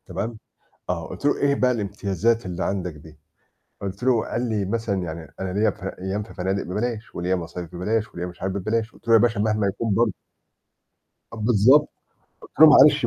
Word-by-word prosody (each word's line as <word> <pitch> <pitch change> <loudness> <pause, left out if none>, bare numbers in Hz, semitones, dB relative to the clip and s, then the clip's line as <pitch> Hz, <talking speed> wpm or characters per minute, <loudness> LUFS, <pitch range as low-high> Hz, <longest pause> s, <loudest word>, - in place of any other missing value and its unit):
تمام، 110 +1 -4 0.5
آه 85 -3 -2
قُلت - - -9
له: 145 - +3
"إيه 140 0 +2
بقى 125 -2 +2
الامتيازات 105 0 0
اللي 90 0 -3
عندك 90 -3 -2
دي؟"، 75 +1 -15 0.6
قُلت 100 +3 -5
له 125 -3 +3
قال 120 0 -2
لي: 105 -3 0
"مثلًا 100 -2 -1
يعني 80 -1 -7
أنا 95 -1 -3
ليّا 105 +2 +3
ف 100 0 -9
أيّام 95 +2 -3
في 110 - -13
فنادق 95 +1 -1
ببلاش، 110 +4 -4
وليّا 90 +2 0
مصايف 85 0 -6
ببلاش، 105 +4 -1
وليّا 85 - -4
مش 90 - -12
عارف 95 0 -2
ببلاش"، 110 +3 -1
قُلت - - -22
له: 115 - +4
"يا 115 - +8
باشا 115 -1 +2
مهما 105 -1 +1
يكون 100 +1 -1
برضه". 115 -4 +2 1.2
بالضبط. 120 +6 +4 0.5
قُلت - - -13
له: - - +12
"معلش - - +7
100 Hz, 190 wpm, -23 LUFS, 95-115 Hz, 1.2 s, له